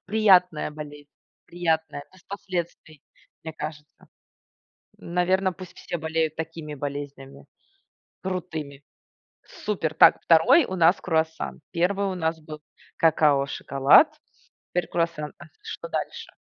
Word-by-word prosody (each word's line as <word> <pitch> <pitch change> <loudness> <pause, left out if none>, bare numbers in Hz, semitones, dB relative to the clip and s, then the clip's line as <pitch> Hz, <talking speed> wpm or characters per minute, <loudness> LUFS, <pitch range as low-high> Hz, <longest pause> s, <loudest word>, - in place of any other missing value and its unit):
Приятная 185 -7 +3
болезнь, 145 -1 -10 0.4
приятная, 160 -4 -2
без 185 - -20
последствий, 175 -6 -6 0.4
мне 160 0 -6
кажется. 150 -1 -9 0.9
Наверно, 185 +2 0
пусть 185 0 -12
все 175 - -5
болеют 160 0 -1
такими 160 -2 -6
болезнями, 140 -1 -7 0.8
крутыми. 160 -7 -5 0.6
Супер! 165 -7 -3
Так, - - +6
2 245 - +5
у 190 - -5
нас 170 +1 +4
круассан. 160 -2 -2
1 195 +3 0
у 190 - -3
нас 160 -1 -1
был 155 0 -10 0.4
какао-шоколад. 150 - +4 0.5
Теперь 180 -2 -1
круассан. 165 -3 -2
А - - -12
с - - -24
что 445 +2 -7
дальше? - - -5
165 Hz, 115 wpm, -25 LUFS, 150-185 Hz, 0.9 s, Так